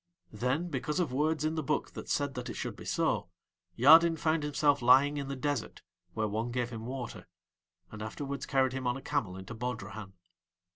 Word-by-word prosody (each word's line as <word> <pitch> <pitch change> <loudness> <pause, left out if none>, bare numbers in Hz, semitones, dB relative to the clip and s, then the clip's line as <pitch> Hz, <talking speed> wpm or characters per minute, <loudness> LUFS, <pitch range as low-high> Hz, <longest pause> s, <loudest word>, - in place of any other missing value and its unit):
Then 130 +10 -1
because 150 +2 -2
of 160 -8 0
words 155 +2 +1
in 155 - +1
the 160 - -1
book 150 +1 -1
that - - -8
said 145 -1 0
that 125 -2 -5
it - - -5
should - - -4
be - - -11
so, 90 - 0 0.5
Yadin 160 +6 +7
found 160 0 +1
himself 145 -1 +2
lying 135 +4 +5
in 140 -1 -3
the 140 - -3
desert 145 +2 -3 0.3
where 110 -1 0
one 110 +3 -2
gave 120 0 -2
him 115 -1 -6
water, 130 -2 -6 0.6
and 110 - -8
afterwards 140 +5 -5
carried 130 -2 +2
him 130 -1 -3
on 125 +2 0
a - - -9
camel 95 -4 -2
into 95 +5 -8
Bodrahan. 110 -4 -5
135 Hz, 195 wpm, -31 LUFS, 120-145 Hz, 0.6 s, Yadin